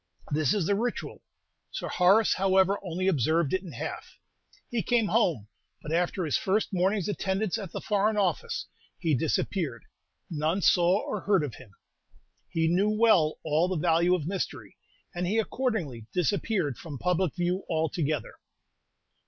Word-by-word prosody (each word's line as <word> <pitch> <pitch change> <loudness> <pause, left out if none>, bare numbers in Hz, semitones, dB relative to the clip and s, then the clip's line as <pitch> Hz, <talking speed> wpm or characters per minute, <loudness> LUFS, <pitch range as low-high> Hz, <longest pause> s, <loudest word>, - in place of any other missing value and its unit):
This 145 0 +2
is 195 -6 0
the 200 - +2
ritual. 235 +4 -3 0.5
Sir - - -5
Horace, 195 +4 +4
however, 190 +1 +3
only 185 0 -2
observed 160 -1 +2
it 185 - +1
in 185 -4 -10
half. - - -6 0.5
He 235 -2 0
came 230 -3 +1
home; 170 - +1 0.4
but 150 - -6
after 175 +2 0
his 150 - +1
first 205 +2 0
morning's 190 +1 +1
attendance 200 +1 -1
at 195 -5 -7
the - - -5
Foreign 210 +1 +1
Office, 185 -6 -1 0.3
he 160 -2 0
disappeared; 145 - -1 0.4
none 160 +4 -1
saw 180 +3 +4
or 210 - -4
heard 195 -5 +2
of 140 -6 -4
him. 125 +1 -13 0.8
He 165 0 +1
knew 185 +5 +2
well 215 -8 +3
all 160 +2 +2
the 185 - -2
value 170 +2 +3
of 160 -5 -4
mystery, 190 +2 -4 0.4
and 175 0 -2
he 210 +5 0
accordingly 205 - -2
disappeared 180 - 0
from 150 -4 -7
public 180 +2 0
view 180 +2 -1
altogether. 155 -4 -1
180 Hz, 155 wpm, -28 LUFS, 160-200 Hz, 0.8 s, Horace